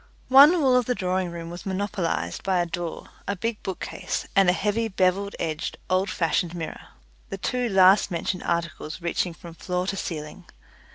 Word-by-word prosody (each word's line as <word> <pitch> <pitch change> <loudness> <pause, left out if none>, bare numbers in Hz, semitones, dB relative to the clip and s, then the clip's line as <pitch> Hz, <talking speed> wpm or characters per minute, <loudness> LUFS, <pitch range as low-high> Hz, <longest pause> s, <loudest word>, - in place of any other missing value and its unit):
One 285 +7 +8
wall 265 -4 +4
of 250 -1 +3
the 250 - +1
drawing 185 -1 -1
room 170 0 -7
was 175 - -8
monopolized 185 - -2
by 190 -2 +1
a 175 - +2
door, 175 -1 -5 0.2
a 200 - -1
big 225 +3 -3
bookcase, 190 - -4
and 195 -3 +5
a - - +7
heavy 210 +4 0
bevelled 195 0 +1
edged 160 -2 -3
old 185 +2 +2
fashioned 170 0 0
mirror 165 -2 -6 0.4
the 195 - -4
two 245 +5 -1
last 190 0 +6
mentioned 180 +1 -2
articles 170 -2 -3
reaching 170 0 -1
from 170 +1 -11
floor 180 +2 -3
to 195 - -2
ceiling. 165 -1 -6
185 Hz, 175 wpm, -25 LUFS, 170-200 Hz, 0.4 s, One